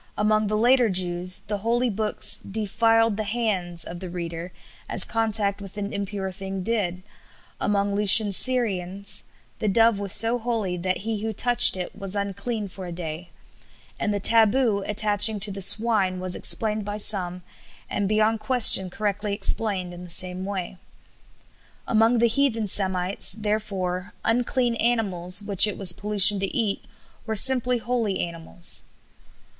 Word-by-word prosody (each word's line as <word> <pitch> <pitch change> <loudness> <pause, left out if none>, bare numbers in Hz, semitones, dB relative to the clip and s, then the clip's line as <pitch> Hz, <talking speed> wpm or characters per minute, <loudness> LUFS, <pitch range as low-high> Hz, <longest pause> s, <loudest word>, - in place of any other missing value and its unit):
Among 215 0 0
the 215 +1 -2
later 245 +1 +2
Jews 180 -1 +2
the 205 -1 -6
Holy 235 +4 -1
Books 210 +1 -2
'defiled 225 +1 -1
the 215 - -3
hands' 200 -6 -4
of 175 +1 -9
the 185 -1 -8
reader 170 0 -7 0.4
as - - +6
contact 215 -3 -1
with 195 0 -11
an 205 0 -6
impure 200 -1 -5
thing 190 0 -7
did; 185 -5 -3 0.6
among 200 -1 -2
Lucian's 205 0 +7
Syrians 200 -7 -1 0.3
the 215 - -3
dove 225 +1 +2
was 200 -2 -1
so 230 +3 +4
holy 225 -6 -4
that 185 +1 -3
he 225 -2 -3
who 220 +1 -4
touched 240 -2 +6
it 180 - -7
was 195 -1 -5
unclean 200 +2 -5
for 190 -1 -10
a - - -8
day; 170 0 -8 0.7
and 210 - -2
the 205 - -3
taboo 220 0 +2
attaching 210 0 +2
to 205 0 +1
the 195 0 -7
swine 195 -2 +4
was 185 -1 0
explained 215 -1 +2
by 205 +1 -6
some, 180 -4 -1 0.4
and 200 -1 -3
beyond 215 +1 0
question 220 -7 +4
correctly 205 +1 -4
explained, 195 -4 -1
in 175 0 -11
the 180 - -12
same 180 +2 0
way. 190 -2 -6 1.1
Among 225 +1 +1
the 235 +1 +2
heathen 230 -3 -1
Semites, 185 -1 -1
therefore, 200 -3 -4
unclean 245 +1 -1
animals, 200 -5 -1
which 205 0 +3
it 210 - -6
was 185 -3 +9
pollution 205 0 +2
to 195 - -2
eat, 215 -4 -2 0.4
were 220 - -3
simply 250 +2 +4
holy 230 -4 -3
animals." 170 0 -5
205 Hz, 150 wpm, -23 LUFS, 185-225 Hz, 1.1 s, was